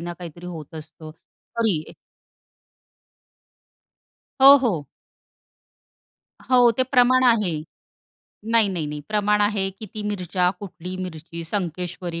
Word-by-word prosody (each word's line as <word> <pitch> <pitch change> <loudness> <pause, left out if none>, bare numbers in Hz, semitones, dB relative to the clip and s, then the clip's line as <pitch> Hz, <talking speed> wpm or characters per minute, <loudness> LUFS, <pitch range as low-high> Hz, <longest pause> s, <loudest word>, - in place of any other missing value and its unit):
ना 175 +1 -5
काहीतरी 175 0 -9
होत 160 -3 -9
असतं, 155 0 -10 0.5
तरी 195 -9 0 2.5
हो, 275 +1 +10
हो. 205 - -1 1.6
हो, 245 -2 +6
ते - - +5
प्रमाण 255 0 +3
आहे. 220 -7 +3 1.0
नाही, 230 -3 +4
नाही, 175 -5 -3
नाही 150 0 -6
प्रमाण 210 0 +1
आहे. 205 -2 +1
किती 215 0 -7
मिरच्या, 185 -3 -1
कुठली 185 -2 -8
मिरची, 170 -2 -7
संकेश्वरी 175 -1 -4
185 Hz, 105 wpm, -23 LUFS, 170-215 Hz, 2.5 s, हो